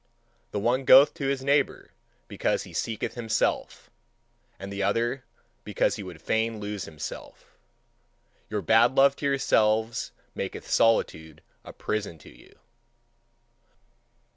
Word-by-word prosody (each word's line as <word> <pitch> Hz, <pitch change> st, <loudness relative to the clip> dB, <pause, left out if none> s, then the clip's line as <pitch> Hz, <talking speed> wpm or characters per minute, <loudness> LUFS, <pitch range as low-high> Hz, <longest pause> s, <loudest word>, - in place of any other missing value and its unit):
The 105 Hz, -, -5 dB
one 125 Hz, +5 st, +1 dB
goeth 140 Hz, +2 st, +7 dB
to 145 Hz, -5 st, -4 dB
his 135 Hz, -1 st, -1 dB
neighbour 140 Hz, 0 st, 0 dB, 0.4 s
because -, -, -1 dB
he -, -, -13 dB
seeketh 115 Hz, -2 st, -3 dB
himself, 115 Hz, -2 st, -2 dB, 0.7 s
and 100 Hz, +1 st, -8 dB
the 100 Hz, -, -4 dB
other 115 Hz, +6 st, 0 dB, 0.4 s
because -, -, 0 dB
he -, -, -6 dB
would 90 Hz, -4 st, -9 dB
fain 110 Hz, 0 st, 0 dB
lose 105 Hz, -2 st, -5 dB
himself. 75 Hz, -2 st, -9 dB, 0.9 s
Your 105 Hz, -2 st, -3 dB
bad 120 Hz, +3 st, +4 dB
love 140 Hz, 0 st, +5 dB
to 140 Hz, -, -2 dB
yourselves 110 Hz, -5 st, +1 dB, 0.2 s
maketh -, -, -6 dB
solitude 80 Hz, -8 st, +1 dB, 0.2 s
a -, -, -10 dB
prison 105 Hz, -6 st, -4 dB
to 70 Hz, -, -16 dB
you. -, -, -20 dB
110 Hz, 125 wpm, -26 LUFS, 100-130 Hz, 0.9 s, goeth